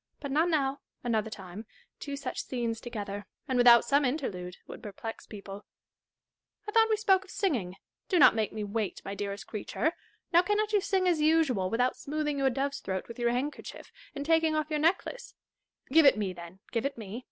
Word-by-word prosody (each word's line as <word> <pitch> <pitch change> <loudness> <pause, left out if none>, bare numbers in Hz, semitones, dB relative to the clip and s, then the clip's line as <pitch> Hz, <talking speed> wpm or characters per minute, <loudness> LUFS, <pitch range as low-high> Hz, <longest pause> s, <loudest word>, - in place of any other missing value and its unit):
But 280 -2 -5
not 315 +5 +3
now, 280 -4 +1
— - - -50
another 220 -3 0
time: 195 +1 -9 0.3
two 285 -1 -5
such 275 - -4
scenes 235 -3 -3
together, 205 -4 -6 0.2
and 260 - -1
without 240 -1 +7
some 280 +4 +3
interlude, 205 - -3
would - - -10
perplex 225 +1 -7
people, 200 -1 -9 1.0
I - - -3
thought 450 +1 +5
we 435 - +3
spoke 385 -3 +3
of - - -19
singing: 235 - -1 0.3
do 370 - +3
not 290 - +8
make 220 -2 -1
me 215 -1 -4
wait, 210 0 -3
my 195 - -4
dearest 200 0 -5
creature! 270 +9 -2 0.4
Now 345 - +7
cannot 420 +3 0
you 410 - +4
sing 380 -1 +1
as 335 -4 +2
usual, 300 - +3
without 245 +4 +1
smoothing 295 -1 -2
your 270 -1 +3
dove's 275 +2 -2
throat 190 -1 -4
with 235 +1 -9
your 240 0 +2
handkerchief, 260 +5 -4 0.2
and 285 0 -4
taking 320 0 +3
off 310 0 -1
your 300 - +1
necklace 355 +10 0 0.5
1 - - -9
Give 325 -1 +7
it 270 - +6
me, 200 -3 -2
then; 170 +2 -11
give 230 - -1
it 275 -1 -2
me. 220 +1 -6
255 Hz, 200 wpm, -29 LUFS, 210-310 Hz, 1.0 s, not